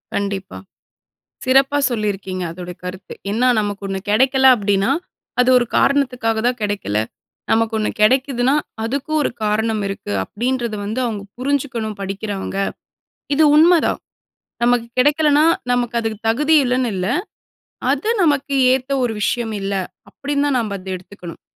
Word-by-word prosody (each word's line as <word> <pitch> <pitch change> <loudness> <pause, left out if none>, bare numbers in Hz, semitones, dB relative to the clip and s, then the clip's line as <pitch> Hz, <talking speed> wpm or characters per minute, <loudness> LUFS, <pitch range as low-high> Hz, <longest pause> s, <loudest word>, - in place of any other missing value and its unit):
கண்டிப்பா. 195 - -3 0.9
சிறப்பா 270 +2 +3
சொல்லியிருக்கீங்க 195 -5 -2
அதோட 180 +1 -8
கருத்து. 185 +1 -7 0.2
என்னன்னா 245 +5 +2
நமக்கு 205 -1 -4
ஒண்ணு 195 0 -2
கெடைக்கல 265 +4 +4
அப்டினா 200 +1 +1 0.5
அது 250 - +3
ஒரு 240 - -1
காரணத்துக்காக 250 -5 +1
தான் 245 0 0
கெடைக்கல. 200 - -1 0.5
நமக்கு 225 0 +2
ஒண்ணு 215 - 0
கெடைக்குதுன்னா 255 +3 +3 0.3
அதுக்கும் 280 +6 -1
ஒரு - - 0
காரணம் 215 +1 0
இருக்கு 195 - -5
அப்டின்றத 240 - -2
வந்து 220 +5 -3
அவங்க 210 -4 -4 0.2
புரிஞ்சுக்கணும் 255 -5 -2
படிக்கிறவங்க. 195 0 -4 0.8
இது 315 - +5
உண்மதான் 330 +2 +4 0.6
நமக்கு 240 -1 +2
கெடைக்கலனா 295 +2 +4 0.3
நமக்கு 245 -1 0
அதுக்கு 220 -2 -3
தகுதி 300 +7 +3
இல்லன்னு 250 -1 0
இல்ல. 185 0 -2 0.8
அது 290 +11 -1
நமக்கு 285 -2 +1 0.2
ஏத்த 260 +1 -2
ஒரு 235 -2 0
விஷயம் 225 +1 -1
இல்ல. 195 +1 -2 0.4
அப்டின்னு 285 0 -2
தான் 270 - +1
நம்ப 215 -3 -3
அத 185 - -14
எடுத்துக்கணும் 180 -2 -11
230 Hz, 130 wpm, -19 LUFS, 205-265 Hz, 0.9 s, இது